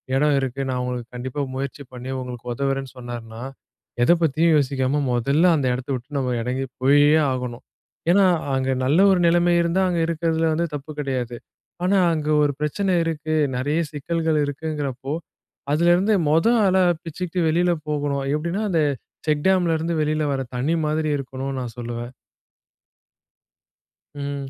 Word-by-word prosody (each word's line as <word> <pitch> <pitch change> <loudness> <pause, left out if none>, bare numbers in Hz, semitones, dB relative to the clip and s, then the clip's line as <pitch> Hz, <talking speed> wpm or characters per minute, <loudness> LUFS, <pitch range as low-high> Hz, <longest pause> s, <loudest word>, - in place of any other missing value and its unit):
இடம் 145 +1 +3
இருக்கு. 135 0 -3
நான் 125 -1 -1
உங்களுக்கு 125 -1 -5
கண்டிப்பா 130 +3 -4
முயற்சி 140 +1 -4
பண்ணி 125 +1 -7
உங்களுக்கு 125 -1 -6
உதவுறேன்னு 135 -1 -2
சொன்னாருன்னா," 120 -1 -7 0.6
எத 145 - +5
பத்தியும் 160 +2 +3
யோசிக்காம 135 +1 0
மொதல்ல 145 +9 +3
அந்த 135 -3 0
எடத்த 130 +2 -7
விட்டு 130 +4 -6
நம்ம 125 -2 -1
எறங்கி 130 +2 -2 0.2
போயே 145 +3 +5 0.2
ஆகணும். 125 -2 -4 0.5
ஏன்னா, 195 +1 +5 0.3
அங்க 130 0 0
நல்ல 150 +7 +3
ஒரு 185 - +3
நிலைமை 175 +1 +3
இருந்தா, 170 +3 +1
அங்க 170 -1 0
இருக்கறதுல 165 0 0
வந்து 170 +2 0
தப்பு 145 +2 -6
கிடையாது. 125 -4 -2 0.5
ஆனா, 195 +2 +3 0.2
அங்க 155 -1 -3 0.2
ஒரு 145 - +2
பிரச்சனை 185 +6 0
இருக்கு, 155 -1 -3 0.2
நெறைய 145 +5 0
சிக்கல்கள் 160 +2 -1
இருக்குங்கிறப்போ, 145 -2 -4 0.6
அதுல 170 +3 +4
இருந்து 200 +4 +2 0.2
மொத 165 +5 +3 0.2
ஆளா 190 -1 +4 0.2
பிச்சுக்ட்டு 175 +1 -3
வெளில 175 +2 +2 0.2
போகணும். 145 -2 -1
எப்டின்னா 170 +7 -2
அந்த 160 -3 +2 0.4
செக்டாம்ல 170 +3 +2
இருந்து 165 +1 -1
வெளில 155 0 0
வரத் 130 -2 -4
தண்ணி 150 +7 +1
மாதிரி 155 0 0
இருக்கணும்னு 135 0 -5
நான் 120 -3 -6
சொல்லுவேன். 120 +1 -5 2.0
ம். 140 -1 -5
145 Hz, 145 wpm, -23 LUFS, 130-165 Hz, 2.0 s, எத